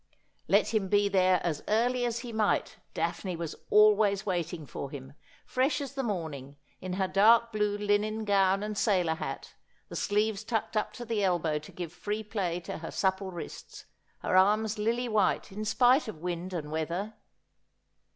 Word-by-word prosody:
Let -, -, +3 dB
him 210 Hz, -3 st, +1 dB
be 205 Hz, +1 st, +3 dB
there 185 Hz, -2 st, +3 dB
as 160 Hz, -4 st, -2 dB
early 245 Hz, +3 st, +2 dB
as 235 Hz, -1 st, -2 dB
he 240 Hz, -2 st, -7 dB
might 215 Hz, -1 st, 0 dB, 0.2 s
Daphne 185 Hz, -3 st, -2 dB
was 165 Hz, -2 st, -5 dB
always 210 Hz, -1 st, +5 dB
waiting 175 Hz, -4 st, -2 dB
for 140 Hz, -, -6 dB
him, 135 Hz, -1 st, -9 dB, 0.3 s
fresh 260 Hz, +5 st, +1 dB
as 280 Hz, -2 st, -5 dB
the 275 Hz, -, -2 dB
morning, 160 Hz, -, -4 dB, 0.3 s
in 185 Hz, 0 st, -4 dB
her 190 Hz, 0 st, 0 dB
dark 230 Hz, +4 st, +5 dB
blue 210 Hz, -1 st, 0 dB
linen 210 Hz, +1 st, 0 dB
gown 195 Hz, -1 st, +3 dB
and 210 Hz, 0 st, -3 dB
sailor 185 Hz, -6 st, +2 dB
hat, 160 Hz, -, -6 dB, 0.4 s
the -, -, -8 dB
sleeves 210 Hz, 0 st, 0 dB
tucked 220 Hz, 0 st, -2 dB
up 215 Hz, -, 0 dB
to 240 Hz, -, -7 dB
the 220 Hz, -3 st, -1 dB
elbow 170 Hz, -5 st, +1 dB
to 155 Hz, -, -13 dB
give 175 Hz, -2 st, -6 dB
free 210 Hz, +4 st, -3 dB
play 190 Hz, -5 st, -2 dB
to 170 Hz, -, -6 dB
her 165 Hz, -, -6 dB
supple 190 Hz, 0 st, 0 dB
wrists, 175 Hz, -2 st, -9 dB, 0.4 s
her -, -, 0 dB
arms 210 Hz, +3 st, +3 dB
lily 235 Hz, +3 st, 0 dB
white 210 Hz, -2 st, +1 dB
in 210 Hz, +2 st, -5 dB
spite 245 Hz, +5 st, +4 dB
of 215 Hz, -, -6 dB
wind 175 Hz, +2 st, -4 dB
and 155 Hz, -4 st, -5 dB
weather. 170 Hz, +7 st, -3 dB
200 Hz, 175 wpm, -29 LUFS, 175-220 Hz, 0.4 s, always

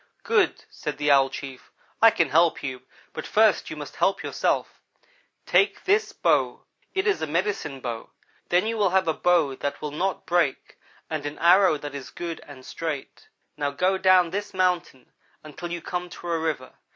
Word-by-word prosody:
"'Good,' 455 Hz, -5 st, +1 dB
said -, -, -5 dB
the 145 Hz, 0 st, +2 dB
Owl 135 Hz, -1 st, +5 dB
chief, 135 Hz, -2 st, -9 dB, 0.3 s
'I 225 Hz, -, +9 dB
can 165 Hz, -8 st, +1 dB
help 165 Hz, +1 st, +3 dB
you, 130 Hz, -2 st, -4 dB, 0.3 s
but -, -, -6 dB
first 215 Hz, -3 st, +3 dB
you -, -, -6 dB
must 145 Hz, -1 st, -9 dB
help 195 Hz, -, +1 dB
yourself. -, -, -1 dB, 0.6 s
Take 405 Hz, -, +2 dB
this 415 Hz, +2 st, +2 dB
bow. -, -, +1 dB, 0.3 s
It 380 Hz, -, +1 dB
is 410 Hz, -, +1 dB
a 160 Hz, -, -1 dB
medicine 165 Hz, -4 st, -2 dB
bow; 115 Hz, -2 st, -5 dB, 0.4 s
then 180 Hz, +3 st, +3 dB
you 225 Hz, +1 st, -1 dB
will 200 Hz, -2 st, +3 dB
have 190 Hz, -1 st, +2 dB
a 160 Hz, -, +2 dB
bow 165 Hz, -5 st, +2 dB
that 140 Hz, +2 st, -4 dB
will 150 Hz, -, -5 dB
not 180 Hz, +6 st, -2 dB
break 170 Hz, -6 st, 0 dB, 0.3 s
and 155 Hz, -2 st, -4 dB
an 145 Hz, -, -7 dB
arrow 180 Hz, -1 st, +5 dB
that 145 Hz, -1 st, -7 dB
is 140 Hz, -2 st, -7 dB
good 170 Hz, -1 st, -6 dB
and 130 Hz, -3 st, -12 dB
straight. 155 Hz, -5 st, -6 dB, 0.3 s
Now 145 Hz, -1 st, 0 dB
go 185 Hz, +7 st, 0 dB
down 185 Hz, -3 st, +5 dB
this 205 Hz, +1 st, -4 dB
mountain 180 Hz, -8 st, -1 dB, 0.3 s
until 160 Hz, +3 st, -8 dB
you 170 Hz, -1 st, -5 dB
come 180 Hz, 0 st, -4 dB
to 175 Hz, -, -8 dB
a 165 Hz, -, +1 dB
river. 155 Hz, -5 st, -3 dB
170 Hz, 185 wpm, -25 LUFS, 145-185 Hz, 0.6 s, I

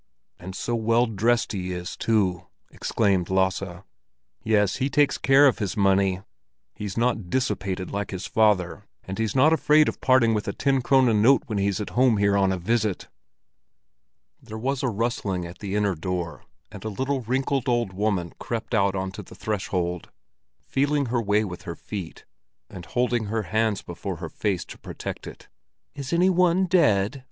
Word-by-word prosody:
"And 95 Hz, +1 st, -8 dB
so 120 Hz, -, -3 dB
well 115 Hz, +1 st, +2 dB
dressed 115 Hz, +2 st, +1 dB
he 95 Hz, -3 st, -3 dB
is 90 Hz, +1 st, -5 dB
too!" 95 Hz, -6 st, 0 dB, 0.2 s
exclaimed 100 Hz, -5 st, 0 dB
Lasse. 95 Hz, -1 st, -1 dB, 0.6 s
"Yes, 105 Hz, -3 st, +2 dB
he 135 Hz, 0 st, 0 dB
takes 145 Hz, 0 st, +2 dB
care 135 Hz, +2 st, +5 dB
of 135 Hz, -, +3 dB
his 100 Hz, -4 st, -3 dB
money. 95 Hz, -1 st, +2 dB, 0.5 s
He's 100 Hz, -, -6 dB
not 115 Hz, -5 st, 0 dB
dissipated, 100 Hz, -6 st, -2 dB
like 100 Hz, 0 st, -3 dB
his 95 Hz, -2 st, -5 dB
father; 105 Hz, -2 st, +1 dB, 0.2 s
and 95 Hz, +3 st, -6 dB
he's 110 Hz, 0 st, -1 dB
not 145 Hz, +5 st, +5 dB
afraid 155 Hz, -1 st, +4 dB
of -, -, -4 dB
parting 130 Hz, -3 st, +4 dB
with 105 Hz, -1 st, -2 dB
a 100 Hz, -, -2 dB
ten 135 Hz, -2 st, +1 dB
krone 125 Hz, -4 st, +3 dB
note 135 Hz, +6 st, +5 dB
when 110 Hz, -7 st, -2 dB
he's 100 Hz, 0 st, 0 dB
at 105 Hz, -, -5 dB
home 125 Hz, -3 st, +3 dB
here 100 Hz, 0 st, +2 dB
on 95 Hz, -1 st, +3 dB
a 95 Hz, -, -1 dB
visit." 105 Hz, +1 st, -1 dB, 1.3 s
There 110 Hz, -, -8 dB
was 130 Hz, +4 st, -2 dB
a 130 Hz, -, 0 dB
rustling 100 Hz, -5 st, -2 dB
at 85 Hz, +2 st, -10 dB
the 100 Hz, -1 st, -4 dB
inner 105 Hz, -2 st, +1 dB
door, 85 Hz, 0 st, -4 dB, 0.3 s
and 100 Hz, -2 st, -10 dB
a 110 Hz, -, -3 dB
little, 130 Hz, +5 st, -2 dB
wrinkled 130 Hz, +2 st, -1 dB
old 120 Hz, -5 st, 0 dB
woman 95 Hz, -3 st, -1 dB
crept 115 Hz, +1 st, -4 dB
out 100 Hz, -3 st, +2 dB
onto 95 Hz, 0 st, -4 dB
the -, -, -14 dB
threshold, 90 Hz, -4 st, -3 dB, 0.5 s
feeling 145 Hz, +1 st, 0 dB
her 120 Hz, -, +2 dB
way 105 Hz, 0 st, +2 dB
with 90 Hz, -4 st, -6 dB
her 85 Hz, -4 st, -6 dB
feet, 95 Hz, -4 st, -8 dB, 0.5 s
and 90 Hz, -2 st, -9 dB
holding 120 Hz, -2 st, 0 dB
her 110 Hz, +1 st, -2 dB
hands 110 Hz, +1 st, 0 dB
before 90 Hz, +2 st, -5 dB
her 80 Hz, -1 st, -7 dB
face 100 Hz, -1 st, -2 dB
to -, -, -11 dB
protect -, -, -7 dB
it. -, -, -11 dB, 0.5 s
"Is 140 Hz, -2 st, -6 dB
any 180 Hz, +2 st, +4 dB
one 180 Hz, +1 st, +3 dB
dead?" 120 Hz, -, +2 dB
105 Hz, 175 wpm, -25 LUFS, 95-125 Hz, 1.3 s, care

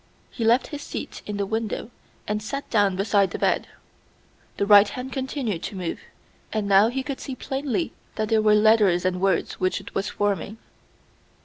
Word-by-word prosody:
He 235 Hz, -, -4 dB
left 235 Hz, +3 st, +3 dB
his 290 Hz, -, -4 dB
seat -, -, -6 dB
in 210 Hz, -1 st, -3 dB
the 200 Hz, -, 0 dB
window 220 Hz, +2 st, -3 dB, 0.4 s
and 210 Hz, 0 st, -1 dB
sat 275 Hz, +6 st, -5 dB
down 205 Hz, -4 st, +3 dB
beside 200 Hz, 0 st, +2 dB
the -, -, -5 dB
bed. -, -, +1 dB, 0.9 s
The 200 Hz, -, +1 dB
right 205 Hz, 0 st, +7 dB
hand 255 Hz, +4 st, -6 dB
continued 260 Hz, -, -3 dB
to 200 Hz, -, -5 dB
move, 180 Hz, -3 st, -4 dB, 0.5 s
and 215 Hz, -2 st, -1 dB
now 200 Hz, +2 st, +6 dB
he 260 Hz, +3 st, -2 dB
could 275 Hz, -1 st, -5 dB
see 265 Hz, -, -6 dB
plainly 275 Hz, +4 st, -2 dB, 0.2 s
that 215 Hz, -1 st, -2 dB
they 225 Hz, -1 st, +3 dB
were 215 Hz, 0 st, +4 dB
letters 210 Hz, -5 st, +4 dB
and 185 Hz, 0 st, 0 dB
words 195 Hz, -1 st, 0 dB
which 185 Hz, 0 st, 0 dB
it -, -, -12 dB
was 195 Hz, +1 st, -1 dB
forming. 205 Hz, +1 st, -2 dB
210 Hz, 185 wpm, -24 LUFS, 200-245 Hz, 0.9 s, right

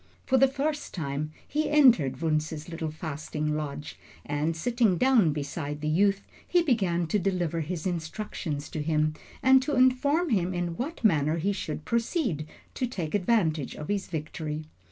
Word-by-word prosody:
For 260 Hz, -1 st, +3 dB
the 270 Hz, -, +7 dB
first 290 Hz, +3 st, -3 dB
time 150 Hz, -2 st, -3 dB, 0.2 s
he 305 Hz, +1 st, 0 dB
entered 230 Hz, -, +5 dB
Wunzh's 155 Hz, -1 st, -1 dB
little 165 Hz, -2 st, -4 dB
fasting 155 Hz, -1 st, -3 dB
lodge, 150 Hz, -1 st, -5 dB, 0.3 s
and 150 Hz, +3 st, -1 dB
sitting 230 Hz, 0 st, +2 dB
down 245 Hz, -9 st, +4 dB
beside 145 Hz, 0 st, -4 dB
the 155 Hz, -, -3 dB
youth, 195 Hz, +5 st, +2 dB, 0.2 s
he 350 Hz, -1 st, +3 dB
began 190 Hz, -, +1 dB
to 185 Hz, +6 st, +1 dB
deliver 175 Hz, -3 st, 0 dB
his 160 Hz, +2 st, -4 dB
instructions 165 Hz, -3 st, -3 dB
to 155 Hz, -, -4 dB
him 155 Hz, 0 st, +1 dB, 0.3 s
and 265 Hz, 0 st, +7 dB
to 290 Hz, +2 st, -1 dB
inform 280 Hz, +6 st, +3 dB
him 185 Hz, -3 st, +1 dB
in 175 Hz, -1 st, -2 dB
what 275 Hz, -, -5 dB
manner 155 Hz, -6 st, +3 dB
he 195 Hz, +5 st, 0 dB
should 155 Hz, -5 st, -5 dB
proceed 230 Hz, -, -1 dB, 0.3 s
to 255 Hz, -, -1 dB
take 175 Hz, -10 st, -4 dB
advantage 180 Hz, -, +1 dB
of 150 Hz, -, -7 dB
his 200 Hz, -1 st, -1 dB
victory. 155 Hz, -1 st, -4 dB
170 Hz, 160 wpm, -28 LUFS, 155-235 Hz, 0.3 s, the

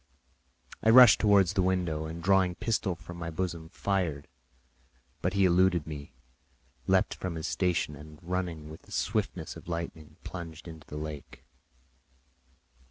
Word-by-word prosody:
I 110 Hz, -, +3 dB
rushed 125 Hz, -1 st, +9 dB
towards 100 Hz, -4 st, +4 dB
the 95 Hz, -, +2 dB
window, 90 Hz, -4 st, 0 dB
and 80 Hz, +1 st, -7 dB
drawing 95 Hz, -1 st, +3 dB
a -, -, -17 dB
pistol 110 Hz, -4 st, -1 dB
from 85 Hz, 0 st, -11 dB
my 85 Hz, -1 st, -4 dB
bosom, 85 Hz, -1 st, -4 dB
fired; 90 Hz, -7 st, -2 dB, 0.9 s
but 90 Hz, -, 0 dB
he 100 Hz, -1 st, +3 dB
eluded 90 Hz, -2 st, +3 dB
me, 75 Hz, -2 st, -8 dB, 0.7 s
leaped -, -, +3 dB
from 90 Hz, -3 st, -5 dB
his 80 Hz, -, -4 dB
station, 90 Hz, -5 st, 0 dB
and 75 Hz, +1 st, -12 dB
running 85 Hz, -3 st, -3 dB
with 80 Hz, -, -11 dB
the -, -, -20 dB
swiftness -, -, -2 dB
of -, -, -12 dB
lightning, 85 Hz, -3 st, -6 dB
plunged 85 Hz, -2 st, -8 dB
into 80 Hz, -2 st, -11 dB
the 75 Hz, -, -7 dB
lake. 75 Hz, -1 st, -7 dB
85 Hz, 150 wpm, -29 LUFS, 80-95 Hz, 0.9 s, rushed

